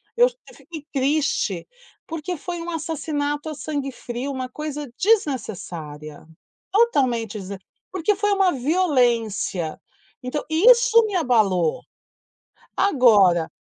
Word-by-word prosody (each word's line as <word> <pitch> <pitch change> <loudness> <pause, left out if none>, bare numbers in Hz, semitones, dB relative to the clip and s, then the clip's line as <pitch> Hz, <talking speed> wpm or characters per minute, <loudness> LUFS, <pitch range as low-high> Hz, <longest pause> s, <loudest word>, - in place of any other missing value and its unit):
Eu 485 +1 +6 0.2
eu - - -16
fiquei 315 -4 -10
triste, 290 +3 0 0.4
porque 330 +2 -4
foi 345 +2 -5
um 340 - -6
assassinato 305 -2 -3
a 310 - -5
sangue 285 -2 -4
frio, 250 +2 -5
uma 260 -1 -4
coisa 295 -1 -6
desnecessária, 180 - -2 0.5
totalmente 255 - +2
desn 195 +1 -6 0.4
porque 380 +3 0
foi 415 +1 0
uma 385 -2 +3
violência, 240 - 0 0.4
então 255 +3 -3
isso 460 +7 +5
me 415 -3 -3
abalou. 210 - +2 0.9
Agora 210 - +4
290 Hz, 110 wpm, -22 LUFS, 230-345 Hz, 0.9 s, Eu